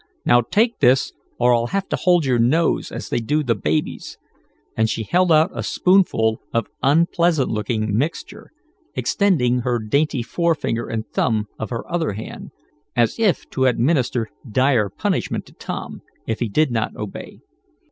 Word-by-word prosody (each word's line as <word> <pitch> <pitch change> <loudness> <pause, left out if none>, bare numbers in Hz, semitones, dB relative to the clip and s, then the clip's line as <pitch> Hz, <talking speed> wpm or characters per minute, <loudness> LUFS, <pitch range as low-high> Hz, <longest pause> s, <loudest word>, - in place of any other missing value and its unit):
Now 120 - +5
take 220 - +1
this 130 0 +3 0.2
or 120 0 +4
I'll 120 0 +1
have 195 +7 -2
to - - 0
hold 175 -4 +2
your 125 -3 +2
nose, 155 +8 +2
as - - -6
they - - 0
do 150 +7 0
the 120 -4 +1
baby's," 80 -7 -3 0.6
and 110 0 +1
she 110 +1 -2
held 180 - +2
out 160 +4 +4
a - - -4
spoonful 175 - +2
of 115 - 0 0.2
unpleasant 165 0 +2
looking 110 -1 -1
mixture, 165 - -3 0.4
extending 135 - +1
her 125 0 0
dainty 130 +4 0
forefinger 155 -5 -1
and 110 -1 -4
thumb 105 -2 0
of 110 - -4
her 115 -2 -5
other 165 -9 -1
hand, 110 +3 -8 0.5
as 120 - +1
if 215 -5 +1
to 130 -1 +2
administer 125 -3 +1 0.2
dire 125 -2 +2
punishment - - -2
to - - -18
Tom, - - -7 0.2
if 110 - -3
he 120 - -1
did 150 +5 +2
not 115 -2 -2
obey. 105 -2 -8
125 Hz, 160 wpm, -21 LUFS, 115-165 Hz, 0.6 s, Now